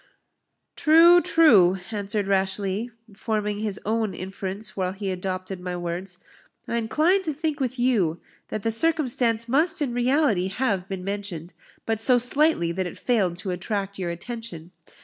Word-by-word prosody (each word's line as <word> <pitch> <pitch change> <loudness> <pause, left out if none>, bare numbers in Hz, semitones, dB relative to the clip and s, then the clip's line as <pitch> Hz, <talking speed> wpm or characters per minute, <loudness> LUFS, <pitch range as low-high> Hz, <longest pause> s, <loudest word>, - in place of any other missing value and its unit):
"True, 335 +3 +6
true," 210 - +5
answered 205 -1 -2
Rashleigh, 195 +2 0 0.3
forming 210 -1 -2
his 210 -2 -3
own 220 -3 -1
inference 195 +3 -6
while 185 -1 -1
he 195 -1 -4
adopted 185 0 -4
my 180 0 -4
words; 175 +2 -5 0.5
"I 235 - -1
incline 310 - +2
to 315 -5 -3
think 310 -1 -2
with 260 -1 -2
you, 210 -10 +1 0.3
that 215 - -5
the 225 - +1
circumstance 240 -4 +1
must 320 +9 +2
in 275 -5 -1
reality 245 - +2
have 195 -3 -1
been 190 -2 -5
mentioned, 195 -4 -5 0.3
but 225 -1 -1
so 245 +3 +4
slightly 250 - +2
that 185 +1 -2
it - - -9
failed 195 -8 0
to 185 +1 -4
attract 195 +2 -3
your 180 -2 -2
attention. 175 -2 -7
210 Hz, 150 wpm, -24 LUFS, 185-245 Hz, 0.5 s, True